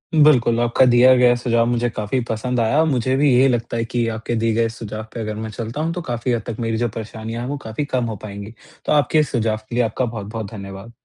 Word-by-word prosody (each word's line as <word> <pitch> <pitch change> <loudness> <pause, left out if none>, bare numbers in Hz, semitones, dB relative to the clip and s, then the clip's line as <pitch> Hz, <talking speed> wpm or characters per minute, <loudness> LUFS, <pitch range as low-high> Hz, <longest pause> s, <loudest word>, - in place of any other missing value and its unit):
बिल्कुल, 130 -7 +5
आपका 120 +2 +3
दिया 125 +2 +7
गया 125 -1 +5
सुझाव 120 -1 +1
मुझे 120 0 +1
काफ़ी 110 +3 -2
पसंद 125 +3 -1
आया। 115 +8 +3
मुझे 130 -3 +1
भी 145 +2 +3
यही 130 +2 +5
लगता 120 -2 -1
है 115 - -1
कि 120 0 -1
आपके 115 +1 -3
दिए 115 0 +1
गए 115 +1 +1
सुझाव 110 -1 -7
पे - - -6
अगर 110 -1 -4
मैं 110 +1 -5
चलता 115 +6 -5
हूँ 165 +1 -1
तो 180 - -4
काफ़ी 120 -4 -2
हद 115 - -1
तक 115 -1 -5
मेरी 115 -1 -1
जो 120 +1 0
परेशानियाँ 110 +1 -6
हैं 125 - -4
वो 145 - -3
काफ़ी 110 +7 -3
कम 130 -4 -1
हो 110 -2 -4
पाएँगी। 100 +1 -8 0.3
तो - - -1
आपके 150 +1 +3
इस 150 - +1
सुझाव 110 -3 0
के - - -5
लिए 120 - +3
आपका 115 +3 -1
बहुत-बहुत 110 -2 -6
धन्यवाद। 100 +1 -9
115 Hz, 250 wpm, -20 LUFS, 110-125 Hz, 0.3 s, दिया